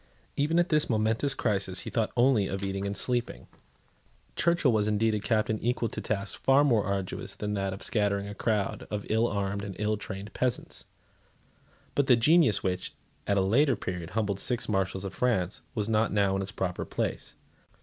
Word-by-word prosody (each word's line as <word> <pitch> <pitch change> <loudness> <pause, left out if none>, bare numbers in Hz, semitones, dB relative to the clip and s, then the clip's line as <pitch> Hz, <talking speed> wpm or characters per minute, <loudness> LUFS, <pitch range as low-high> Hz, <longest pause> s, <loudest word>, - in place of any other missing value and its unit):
Even 150 +4 +1
at 175 0 +3
this 155 -1 +2
momentous 115 +5 +1
crisis 95 -6 0
he - - -7
thought 115 -3 0
only 120 -5 +4
of 95 +1 -4
eating 95 0 -2
and 100 0 -3
sleeping. 120 +1 -1 0.9
Churchill 170 -6 +3
was 105 -2 +1
indeed 110 +1 +2
a 105 - 0
captain 110 0 0
equal 120 -1 0
to - - -6
tasks 100 -2 -2
far 135 +2 +3
more 120 -8 +3
arduous 100 0 -3
than 105 0 -3
that 95 -1 -1
of 95 - -7
scattering 100 -2 0
a 100 - -6
crowd 105 -1 -1
of 105 -1 -4
ill 110 +2 +3
armed 100 -1 -2
and 100 -2 -6
ill 105 0 0
trained 100 0 -7
peasants. 125 -1 -2 1.1
But 140 -2 +1
the 125 - +7
genius, 145 - +4
which, 90 -1 -2 0.3
at 100 - +2
a - - +4
later 130 +9 +3
period, 90 -3 -5
humbled 100 -3 0
six 120 +3 -1
Marshals 95 -2 -1
of 95 - -5
France, 105 -7 0
was 105 -2 -1
not 110 0 +2
now 100 -1 +2
in 95 - -1
its 95 0 -5
proper 90 -2 -3
place. - - -4
105 Hz, 190 wpm, -28 LUFS, 100-120 Hz, 1.1 s, the